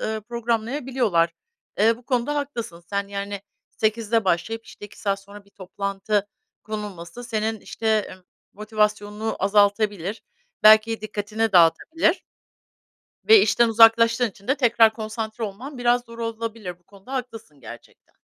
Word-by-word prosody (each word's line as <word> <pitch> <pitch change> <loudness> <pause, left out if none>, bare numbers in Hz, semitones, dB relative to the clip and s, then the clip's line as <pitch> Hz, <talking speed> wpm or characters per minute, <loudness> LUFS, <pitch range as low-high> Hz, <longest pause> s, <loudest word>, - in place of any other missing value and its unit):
ııı, 220 0 -3
programlayabiliyorlar. 235 - -1 0.5
Eee, 225 +1 +4
bu 245 - -18
konuda 255 +2 0
haklısın 235 -11 -4
sen, 200 +1 -3
yani, 200 0 -5 0.3
8'de 220 0 0
başlayıp, 220 +6 -1
işte, 205 - -11
2 205 - -18
saat 200 -1 -1
sonra 200 +1 -14
bir 200 - -26
toplantı 200 +2 -3 0.4
konulması 210 0 -7
senin, 220 -1 -2
işte, 225 - -7 0.2
emm, 185 0 -13 0.3
motivasyonunu 210 0 -2
azaltabilir, 205 -1 +1 0.4
belki 220 +1 +6
dikkatini 215 +1 -2
dağıtabilir 315 - +3 1.1
ve 440 -2 +9
işten 235 -1 +3
uzaklaştığın 230 +1 +5
için 200 +3 -20
de 270 - +4
tekrar 230 -4 +4
konsantre 220 +1 -5
olman 245 +7 -8
biraz 245 0 +2
zor 230 -1 -13
olabilir 225 -5 -5
bu 175 - -37
konuda 200 +7 -14
haklısın, 225 - -6
gerçekten. 115 - -14
220 Hz, 130 wpm, -23 LUFS, 200-230 Hz, 1.1 s, ve